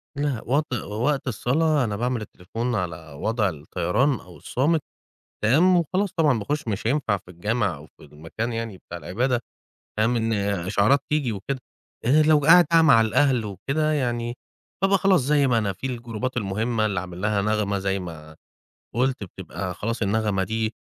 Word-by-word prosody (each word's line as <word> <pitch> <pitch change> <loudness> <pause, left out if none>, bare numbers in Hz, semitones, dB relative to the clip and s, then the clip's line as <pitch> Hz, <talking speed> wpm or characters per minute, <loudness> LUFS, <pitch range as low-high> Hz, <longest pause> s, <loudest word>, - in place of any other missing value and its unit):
لأ، 140 -4 -1
وت 140 +2 0
وقت 120 +5 -1
الصلا، 145 +5 +1
أنا 105 -4 -2
باعمل 120 +2 -1
التليفون 115 +5 -4
على 85 -5 -4
وضع 110 -2 +1
الطيران 90 - 0
أو 90 -2 -14
الصامت، 155 +5 0 0.6
تمام 160 +12 +5
وخلاص 185 +4 0
طبعًا 150 -8 +3
باخش 145 +7 -3
مش 105 0 -2
هينفع 120 -6 +1
في 90 -1 -15
الجامع 100 +1 -1
أو 75 +1 -12
في - - -21
المكان 80 +10 -5
يعني 115 -3 -4
بتاع 85 - -9
العبادة، 120 +9 -1 0.6
فاهم، 115 +3 +2
إن 115 0 0 0.3
إشعارات 100 +8 +3
تيجي 145 -6 +1
وكده 110 +7 -4 0.5
آآ 145 +6 +5
لو 155 0 +5
قاعد 165 +5 +7
بقى 165 -1 +6
مع 140 -8 +7
الأهل 120 +2 +2
وكده 135 - -1
يعني 120 -4 -1 0.5
ببقى 195 0 +4
خلاص 190 -2 +4
زي 140 +2 +3
ما 120 -3 +3
أنا 105 -3 0
في 115 - -6
الجروبات 120 0 -4
المهمة 110 +1 0
اللي 100 -4 -1
عامل 90 -1 -8
لها 105 0 +1
نغمة- 105 -1 0
زي 95 0 -1
ما 80 -4 -9 0.6
قُلت 130 -1 0
بتبقى 95 0 -6
خلاص 115 +5 -3
النغمة 105 -2 +1
دي 110 +1 -2
115 Hz, 165 wpm, -24 LUFS, 100-140 Hz, 0.6 s, قاعد